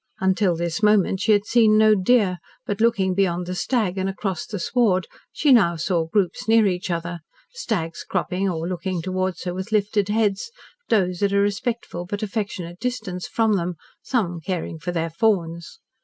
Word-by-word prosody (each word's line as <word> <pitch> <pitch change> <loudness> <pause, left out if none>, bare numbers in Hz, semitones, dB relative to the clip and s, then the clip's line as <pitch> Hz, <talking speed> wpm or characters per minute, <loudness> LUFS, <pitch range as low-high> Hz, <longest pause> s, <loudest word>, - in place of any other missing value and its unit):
Until 190 -1 +2
this 170 +3 -2
moment 210 -3 +3
she 215 - +2
had 205 -1 +3
seen 220 -2 +4
no 215 0 +6
deer, 195 -2 +2 0.3
but 205 0 -3
looking 195 -5 +2
beyond 180 -2 0
the 180 - -4
stag 195 -2 -1
and 190 +1 -1
across 195 -3 -3
the 210 - -5
sward 190 -2 +1 0.3
she 290 -3 +3
now 195 -8 +4
saw 165 0 -1
groups 195 +3 -1
near 225 -1 +5
each 185 -1 -1
other, 170 0 -3 0.3
stags 190 - -3
cropping 190 +2 -1
or 165 -1 -3
looking 180 -1 -3
towards 185 0 -2
her 180 -1 -3
with 190 +4 -6
lifted 205 -1 +1
heads, 210 - 0 0.4
does 185 -4 +1
at 200 -1 +2
a - - +3
respectful 200 -3 -1
but 205 +3 -4
affectionate 195 -5 -4
distance 215 -7 -4
from 220 -3 +2
them, 175 0 -2 0.3
some 175 -10 -1
caring 175 -3 -4
for 175 +3 -4
their 165 -1 -2
fawns. 170 - -1
190 Hz, 175 wpm, -23 LUFS, 175-215 Hz, 0.4 s, no